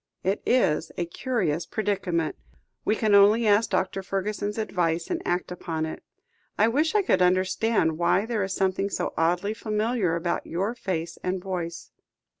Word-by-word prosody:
"It 190 Hz, +2 st, 0 dB
is 160 Hz, -10 st, +2 dB
a 175 Hz, -, 0 dB
curious 170 Hz, -, -1 dB
predicament. 190 Hz, -7 st, -1 dB, 0.5 s
We 215 Hz, -, +2 dB
can 215 Hz, -2 st, +1 dB
only 205 Hz, +3 st, +6 dB
ask 210 Hz, +2 st, +4 dB
Dr. 190 Hz, +1 st, 0 dB
Fergusson's 205 Hz, +2 st, -3 dB
advice, 175 Hz, -6 st, -1 dB
and -, -, -1 dB
act 175 Hz, +1 st, -1 dB
upon 165 Hz, -3 st, -3 dB
it. 160 Hz, -, -6 dB, 0.6 s
I 220 Hz, +2 st, +4 dB
wish 305 Hz, -, +1 dB
I 415 Hz, -, +4 dB
could 360 Hz, -, +2 dB
understand 185 Hz, -1 st, +2 dB
why 185 Hz, +4 st, +2 dB
there 225 Hz, -2 st, -1 dB
is 190 Hz, 0 st, -2 dB
something 190 Hz, +1 st, 0 dB
so -, -, -2 dB
oddly 175 Hz, +5 st, +1 dB
familiar 215 Hz, -4 st, 0 dB
about 170 Hz, +1 st, -2 dB
your 195 Hz, +7 st, -1 dB
face 170 Hz, -8 st, -4 dB
and 185 Hz, +1 st, -1 dB
voice." 175 Hz, -3 st, -5 dB
190 Hz, 160 wpm, -26 LUFS, 170-215 Hz, 0.6 s, only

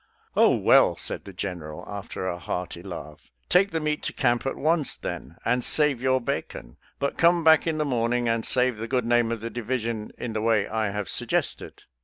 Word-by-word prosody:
" -, -, -36 dB
Oh, -, -, +5 dB
well," -, -, +4 dB
said -, -, -4 dB
the 100 Hz, -, -9 dB
General, 90 Hz, -5 st, -6 dB
after 100 Hz, -2 st, -6 dB
a 90 Hz, -1 st, -3 dB
hearty 90 Hz, -1 st, -5 dB
laugh, 85 Hz, -5 st, -9 dB
" -, -, -43 dB
take 190 Hz, +3 st, +4 dB
the 165 Hz, -, -2 dB
meat 150 Hz, -1 st, -1 dB
to -, -, -2 dB
camp 120 Hz, -1 st, +1 dB
at 135 Hz, -, -2 dB
once, 155 Hz, -1 st, 0 dB
then, -, -, -7 dB
and 125 Hz, +1 st, +1 dB
save 150 Hz, -4 st, +3 dB
your 130 Hz, 0 st, +2 dB
bacon; -, -, -5 dB, 0.2 s
but 140 Hz, -, -3 dB
come 170 Hz, 0 st, +4 dB
back 160 Hz, +1 st, +5 dB
in 160 Hz, -1 st, 0 dB
the 150 Hz, -, 0 dB
morning 120 Hz, -2 st, 0 dB
and 115 Hz, 0 st, 0 dB
save 125 Hz, -2 st, +2 dB
the 115 Hz, +1 st, -5 dB
good 125 Hz, -1 st, 0 dB
name 120 Hz, -1 st, +2 dB
of 115 Hz, -2 st, -3 dB
the 115 Hz, +1 st, -5 dB
division 115 Hz, -2 st, -3 dB
in 115 Hz, -, -5 dB
the 110 Hz, -, -2 dB
way 110 Hz, -2 st, +2 dB
I 110 Hz, -2 st, -1 dB
have 105 Hz, -1 st, -4 dB
suggested." -, -, -1 dB
115 Hz, 215 wpm, -25 LUFS, 105-135 Hz, 0.2 s, Oh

